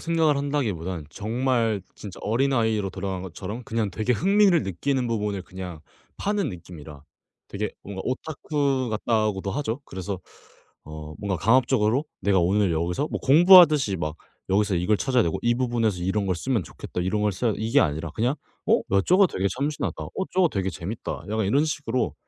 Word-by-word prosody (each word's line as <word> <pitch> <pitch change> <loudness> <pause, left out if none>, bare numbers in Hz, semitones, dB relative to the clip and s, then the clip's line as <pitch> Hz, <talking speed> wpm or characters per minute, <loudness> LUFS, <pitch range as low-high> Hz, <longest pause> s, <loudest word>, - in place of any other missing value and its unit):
생각을 165 -3 +2
한다기보다는 105 - -2
정말 115 - 0
진짜 100 -3 -9
어린아이로 110 -4 +1
돌아간 95 0 -4
것처럼 95 +6 -6
그냥 115 -5 -1
되게 110 +6 0
흥미를 195 - +4
느끼는 125 +8 -1
부분을 105 -4 -2
그냥 90 -3 -8 0.4
파는 205 -4 -1
느낌이라 80 -4 -11 0.5
되게 - - -3
뭔가 95 -1 -6
오타쿠 140 -1 -1
같다고도 105 -3 0
하죠. 120 +2 -2
그래서 95 -2 -5 0.7
어 75 0 -8
'뭔가 100 -2 -2
강압적으로 120 - +3 0.2
내가 100 0 +2
오늘 95 +1 +2
여기서 85 - -1
뭐 - - -2
공부하듯이 155 - +7
막 75 -2 -4 0.3
여기서 100 0 +2
이걸 90 +5 +2
찾아야 125 +2 +2
되고 80 - -1
이 120 0 +3
부분에서 120 -5 0
이런 95 +3 -1
걸 95 - +1
쓰면 120 +2 -1
좋겠다. 90 - -6
이런 105 +4 0
걸 105 -1 +2
써야 110 +5 0
돼.' - - -6
이게 110 +1 +3
아니라 80 0 -1
그냥 120 +5 +1 0.3
'어 - - +5 0.2
야 - - +5
저거 190 +2 +6
되게 100 - -2
참신하다, 145 +2 -2
어 - - -10 0.2
저거 185 -1 +4
되게 95 -7 -2
재밌다.' 95 +6 -6
약간 110 -2 0
이런 140 +9 +3
식으로 130 -6 -2
110 Hz, 390 characters per minute, -25 LUFS, 95-135 Hz, 0.7 s, 공부하듯이